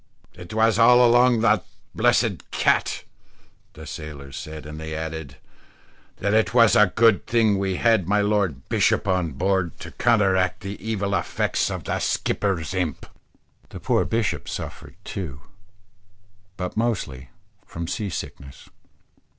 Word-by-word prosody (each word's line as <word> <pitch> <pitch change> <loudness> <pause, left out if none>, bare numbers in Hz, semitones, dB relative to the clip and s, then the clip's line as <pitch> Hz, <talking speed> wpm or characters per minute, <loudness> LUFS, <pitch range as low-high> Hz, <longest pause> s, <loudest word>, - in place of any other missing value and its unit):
"It 90 -1 -11
was 110 0 +2
all 125 +2 +7
along 120 +1 +5
of 110 - -1
that 105 -4 +3 0.3
blessed - - +1
cat," - - +1 0.7
the 80 - -11
sailors 70 -3 -8
said; 75 +1 -8
and 75 0 -8
they 80 0 -6
added, 80 -4 -6 0.8
"that 100 +2 -1
it 110 +2 +2
was 115 -3 +6
a 105 -3 +5
good 110 -4 +4
thing 110 -4 +2
we 95 -1 -1
had 110 -4 +2
my 105 +2 +2
lord 100 -9 0
bishop - - +1
on 90 -5 0
board, 95 +2 -1
to - - -8
counteract 95 -6 +2
the 100 0 -7
evil 100 -3 -2
effects - - 0
of - - -5
the - - -2
skipper's 95 -4 -1
imp." 90 -6 -2 0.6
The - - -9
poor - - +1
bishop 115 -2 -2
suffered - - -7
too, 75 -7 -6 1.2
but 90 -1 -4
mostly 90 - -2 0.4
from 85 0 -6
sea 105 +2 -3
sickness. 70 -5 -8
95 Hz, 140 wpm, -23 LUFS, 80-110 Hz, 1.2 s, all